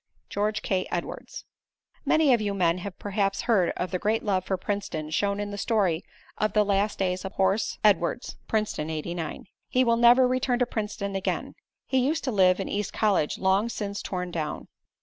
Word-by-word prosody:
George 210 +1 -1
K. 185 -2 0
Edwards 175 - -5 0.6
Many 310 -4 +4
of 235 - +2
you 205 -1 -1
men 175 -2 +2
have 190 +1 -7
perhaps 195 -1 -1
heard 205 -7 +3
of 180 - -2
the 185 - -1
great 215 +3 0
love 190 -3 +1
for 190 0 -1
Princeton 180 -6 -3
shown 200 +4 0
in 205 0 -3
the 205 - -5
story 195 -8 +1 0.4
of 215 -1 +1
the 210 -1 +4
last 200 +1 +1
days 185 -1 -1
of 190 0 -6
Horse 195 +3 +1
Edwards, 200 +1 +2
Princeton 210 -8 -1
'89. 160 +1 -4 0.2
He 255 - +3
will 235 -1 +3
never 240 +2 +6
return 255 0 +1
to 250 - +2
Princeton 210 -3 -4
again. 195 - -2 0.3
He 265 - +1
used 300 +6 0
to 260 - -1
live 185 -3 +4
in 195 - -2
East 205 0 -2
College, 200 -8 +1
long 195 +4 +2
since 200 -3 -4
torn 180 -1 -4
down. 155 -3 -4
200 Hz, 190 wpm, -26 LUFS, 185-220 Hz, 0.6 s, never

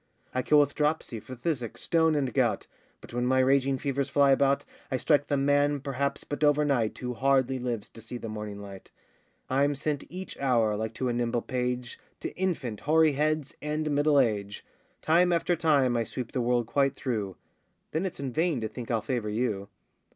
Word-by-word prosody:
I 130 - +1
kill 150 +3 +4
with 145 -1 +3
dropsy, 150 -7 -1
phthisic, 125 -1 -4
stone, 160 -2 +2
and 135 -5 0
gout; - - +1 0.4
But - - -13
when 120 +1 0
my 130 +1 +3
raging 135 +1 +3
fevers 140 +1 -1
fly 140 0 +4
about, 140 +1 +3 0.2
I 130 - 0
strike 145 +2 +2
the 145 - +1
man, 145 +1 +2
perhaps, 140 0 -2
but 145 +1 -4
over 150 0 +4
night, 120 -7 +1
Who 125 -1 -4
hardly 130 +1 +2
lives 120 -4 -3
to 115 - -13
see 120 +2 -7
the 115 - -7
morning 105 -1 -6
light; 100 -1 -11 0.6
I'm 140 +2 +2
sent 145 0 -2
each 185 +2 -7
hour, 115 -6 +2
like 110 +1 -4
to 130 - -1
a - - 0
nimble 120 -1 -1
page, 125 -1 -3 0.2
To - - -5
infant, 160 - -2
hoary 160 +1 +4
heads, 150 0 0
and 150 +1 -2
middle 145 0 +4
age; 100 -4 -1 0.4
Time 175 +3 +4
after 175 +1 +2
time 145 -7 +3
I 115 - +1
sweep 120 +1 -5
the 130 - -1
world 120 0 +1
quite 135 +3 +1
through; 105 -8 -3 0.6
Then 165 +5 0
it's 185 - -8
in 135 -2 -3
vain 160 -2 +1
to 110 - -1
think 115 +2 -8
I'll 115 -2 0
favour 120 -5 -2
you. 105 -3 -2
135 Hz, 195 wpm, -28 LUFS, 120-145 Hz, 0.6 s, kill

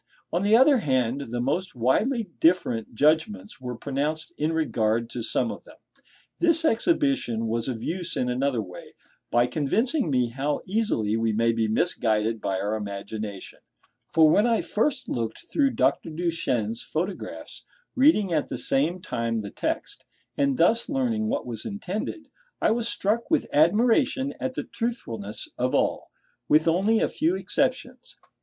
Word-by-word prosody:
On 175 - +1
the 210 +3 +5
other 270 +2 +6
hand, 130 - 0
the 120 +1 -3
most 145 +9 -1
widely 215 - +1 0.2
different 125 -11 +1
judgments 135 -8 +1
were 125 -1 -5
pronounced 145 +5 -3
in 155 +2 0
regard 115 -8 0
to 120 - -4
some 230 - 0
of - - -9
them. - - -16 0.6
This 335 -1 +3
exhibition 275 - +1
was 115 +2 -1
of 120 -3 -4
use 175 0 -3
in 125 - 0
another 125 -2 0
way, 90 -2 -12 0.3
by 120 0 +3
convincing 185 - 0
me 125 -3 +1
how 140 +4 -2
easily 185 - 0
we 115 -1 0
may 115 +2 +2
be 115 -1 0
misguided 110 -3 +1
by 95 -1 -1
our 105 +2 -1
imagination; 100 -1 -6 0.5
for 160 -1 +6
when 205 +9 +4
I 230 -2 +2
first 255 +5 -1
looked 115 -2 -3
through 280 -2 +3
Dr. - - +1
Duchenne's 155 -10 -1
photographs, 180 +5 -5 0.3
reading 250 - +4
at 150 -3 0
the - - -3
same 155 +7 +1
time 115 - -2
the 100 - -7
text, - - -3 0.3
and 140 -2 +1
thus 220 +8 +3
learning 240 -6 0
what - - -1
was 115 -3 -5
intended, 210 - -5 0.3
I - - +2
was 230 0 0
struck 220 +2 -1
with 320 - +2
admiration 240 - +3
at 260 -1 -3
the - - -2
truthfulness 115 - -4
of 125 +1 +1
all, - - 0 0.4
with 155 +2 +4
only 195 +7 +3
a - - +3
few 330 +4 0
exceptions. - - -2
155 Hz, 155 wpm, -25 LUFS, -, 0.6 s, other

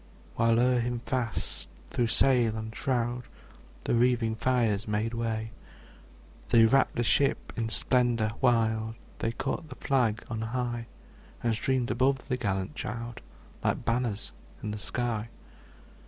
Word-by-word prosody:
'' - - -25
While 115 0 +3
o'er 125 0 +4
him 120 +1 -1
fast, 125 -4 -3 0.2
through 120 - +1
sail 120 -2 +4
and 110 0 -6
shroud, 125 -2 -1 0.6
The - - 0
wreathing 120 -1 +3
fires 115 -3 +1
made 105 +2 -1
way. 110 -1 -2 1.0
They 115 -1 +7
wrapt 135 +4 +3
the 120 - +1
ship 140 +4 +2
in 115 -1 -1
splendor 120 -1 +2
wild, 110 -3 +2 0.2
They 115 - 0
caught 135 +6 -3
the 130 - -8
flag 120 -7 +1
on 115 -1 -4
high, 120 0 -2 0.6
And 115 -1 +2
streamed 125 +1 0
above 130 +3 +1
the 125 - +1
gallant 100 -1 -2
child, 120 -4 -5 0.4
Like - - 0
banners 115 -3 -1 0.3
in 105 - -2
the 105 - -5
sky. 115 0 -2
115 Hz, 140 wpm, -29 LUFS, 110-125 Hz, 1.0 s, They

